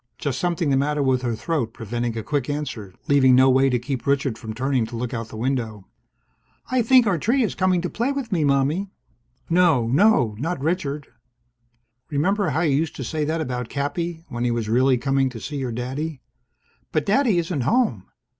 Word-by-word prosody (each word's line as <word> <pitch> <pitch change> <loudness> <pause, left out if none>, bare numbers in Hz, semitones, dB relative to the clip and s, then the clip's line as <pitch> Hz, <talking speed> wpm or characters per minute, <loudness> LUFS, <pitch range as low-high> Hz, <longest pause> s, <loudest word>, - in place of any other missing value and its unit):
Just 135 -3 -2
something 170 -3 0
the 135 - +3
matter 145 +1 +1
with 130 -2 +2
her 120 -3 -1
throat, 125 -4 -2
preventing 120 +1 -3
a 110 - -3
quick 145 +1 -2
answer, 120 -10 -4
leaving 130 -3 +5
no 130 +1 +6
way 135 +1 +4
to 125 - +2
keep 130 +2 -4
Richard 140 -3 +1
from 110 -1 -7
turning 130 +2 0
to 120 - -8
look 125 +2 -4
out 115 -1 -4
the 110 - -10
window. 115 -5 -2 0.9
"I 255 -1 +3
think 250 +1 +5
our 190 -6 +1
tree 245 - +2
is 215 - -1
coming 185 -2 +1
to 180 - -2
play 240 +5 0
with 275 -5 -4
me, 170 -5 +1
Mommie." 145 +7 +1 0.6
No, 165 -8 +3
no! 130 - +3
Not 165 +3 -2
Richard! 150 -2 -2 1.0
"Remember 185 +6 +1
how 150 +3 0
you 150 -5 +2
used 160 0 -2
to 135 - -5
say 150 +4 -2
that 160 +2 -1
about 125 -5 -3
Cappy? 160 +4 -3
When 120 0 -4
he 125 - +1
was 115 -2 -1
really 130 +3 +3
coming 135 +1 +1
to 120 -3 -8
see 145 +5 -5
your 130 -3 -3
daddy?" 130 +5 -4 0.7
"But 155 - 0
Daddy 220 -2 +3
isn't 170 -4 -1
home!" 130 - +1
140 Hz, 200 wpm, -23 LUFS, 125-165 Hz, 1.0 s, no